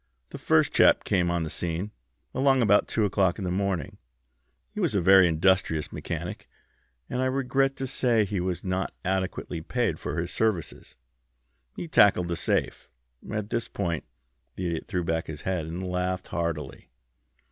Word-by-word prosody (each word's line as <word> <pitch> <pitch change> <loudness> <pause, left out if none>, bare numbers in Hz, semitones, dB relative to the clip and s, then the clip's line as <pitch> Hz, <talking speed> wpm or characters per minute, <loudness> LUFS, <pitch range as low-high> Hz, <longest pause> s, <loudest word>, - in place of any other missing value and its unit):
The - - -7
first - - +3
chap - - +5
came 90 -3 +1
on 85 -1 0
the 80 - -4
scene, 85 +4 -3 0.4
along 135 -1 +3
about 105 -1 +4
two 110 - +1
o'clock 95 -3 +1
in 100 - -5
the 90 - -2
morning. 95 -5 -2 0.7
He - - -7
was - - 0
a - - +4
very 95 +1 +7
industrious 80 -1 +1
mechanic, - - -5 0.6
and 125 - -2
I - - +1
regret 135 +1 +1
to 135 - -4
say 120 -4 +2
he 100 -1 -2
was 90 -1 -2
not 95 0 -2
adequately 95 -2 -2
paid 105 -3 -1
for - - -4
his 85 +1 -3
services. 110 -7 -2 0.8
He 175 - -5
tackled 100 - +4
the 85 - 0
safe." - - -1 0.4
At 105 0 -3
this 115 - -1
point 85 -5 -2 0.5
the 90 - -4
Idiot 85 -2 -3
threw 90 -3 -1
back 80 0 -1
his 75 -2 -7
head 90 -4 -2
and 90 +3 -5
laughed 90 +1 -2
heartily. 85 -5 -4
95 Hz, 170 wpm, -27 LUFS, 85-105 Hz, 0.8 s, very